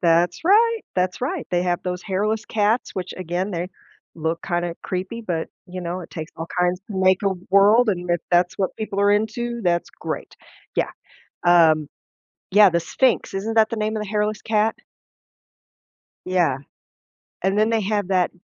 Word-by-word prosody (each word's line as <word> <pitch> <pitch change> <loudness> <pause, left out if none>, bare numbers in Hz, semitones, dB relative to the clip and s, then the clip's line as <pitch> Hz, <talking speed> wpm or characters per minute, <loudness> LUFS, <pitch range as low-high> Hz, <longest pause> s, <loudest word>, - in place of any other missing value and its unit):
That's 170 0 +3
right, 450 +5 +4 0.2
that's 180 +3 0
right, 295 +5 -2
they 175 0 +2
have 175 -1 0
those 180 0 -3
hairless 210 +3 -1
cats, 220 +2 +1
which 185 -1 -5
again, 185 +2 -3
they 175 +1 -3 0.5
look 160 +1 -2
kinda 175 -2 -1
creepy, 190 +5 -4
but, 170 -7 -2 0.2
you 185 0 -7
know, 175 +1 -4
it 170 - -10
takes 160 0 -7
all 165 +1 -6
kinds 180 +1 +1
to - - -5
make 185 0 +3
a 200 - +3 0.2
world, 210 +5 +6
and 180 -3 -1
if 175 - +1
that's 175 0 +2
what 190 -2 -1
people 210 -2 -3
are 205 0 +4
into, 235 +3 -1
that's 175 -1 0
great, - - -6 0.4
yeah, - - 0 0.6
um 160 -4 +5 0.6
Yeah, 205 0 +7
the 170 -1 +1
Sphinx, 250 +8 +1
isn't 215 +4 -3
that 220 -1 +5
the 230 - -2
name 215 +1 -1
of 210 - -2
the 200 - -8
hairless 210 0 -1
cat? 220 0 +1 1.5
Yeah, 175 -7 +1 0.9
and 195 +2 +1
then 215 +1 +3
they 225 -1 +1
have 205 -1 -1
that 185 -2 +2
190 Hz, 175 wpm, -22 LUFS, 175-215 Hz, 1.5 s, Yeah